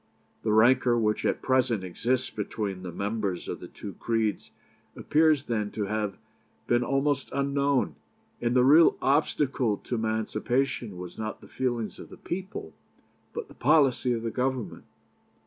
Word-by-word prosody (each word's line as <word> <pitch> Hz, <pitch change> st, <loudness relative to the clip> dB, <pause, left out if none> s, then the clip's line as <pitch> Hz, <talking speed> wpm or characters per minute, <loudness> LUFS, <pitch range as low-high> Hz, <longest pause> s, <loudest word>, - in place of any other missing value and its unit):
The 110 Hz, -, 0 dB
rancour 120 Hz, +2 st, +5 dB
which 105 Hz, -2 st, +1 dB
at -, -, -1 dB
present 125 Hz, -6 st, +2 dB
exists 120 Hz, +8 st, -1 dB
between 100 Hz, -2 st, -4 dB
the 90 Hz, -1 st, -6 dB
members 100 Hz, -1 st, -2 dB
of -, -, -4 dB
the -, -, -9 dB
two 100 Hz, -, -9 dB
creeds 110 Hz, -2 st, -1 dB, 0.5 s
appears 155 Hz, -2 st, +3 dB
then 110 Hz, -5 st, -1 dB
to 105 Hz, -, -2 dB
have 105 Hz, -1 st, -2 dB, 0.5 s
been 120 Hz, 0 st, +2 dB
almost 135 Hz, +2 st, 0 dB
unknown, 140 Hz, 0 st, +1 dB, 0.5 s
and 120 Hz, +1 st, +1 dB
the 125 Hz, -, +5 dB
real 155 Hz, +5 st, +6 dB
obstacle 135 Hz, -5 st, +1 dB
to -, -, -7 dB
emancipation 110 Hz, 0 st, -1 dB
was 90 Hz, +2 st, -8 dB
not 110 Hz, 0 st, -4 dB
the -, -, -15 dB
feelings 120 Hz, -4 st, -2 dB
of -, -, -10 dB
the -, -, -12 dB
people, 180 Hz, -, -6 dB, 0.6 s
but -, -, -5 dB
the -, -, -14 dB
policy 135 Hz, -3 st, +3 dB
of 115 Hz, -1 st, -3 dB
the 115 Hz, -, -2 dB
Government. 125 Hz, -9 st, -2 dB
120 Hz, 150 wpm, -27 LUFS, 105-135 Hz, 0.6 s, real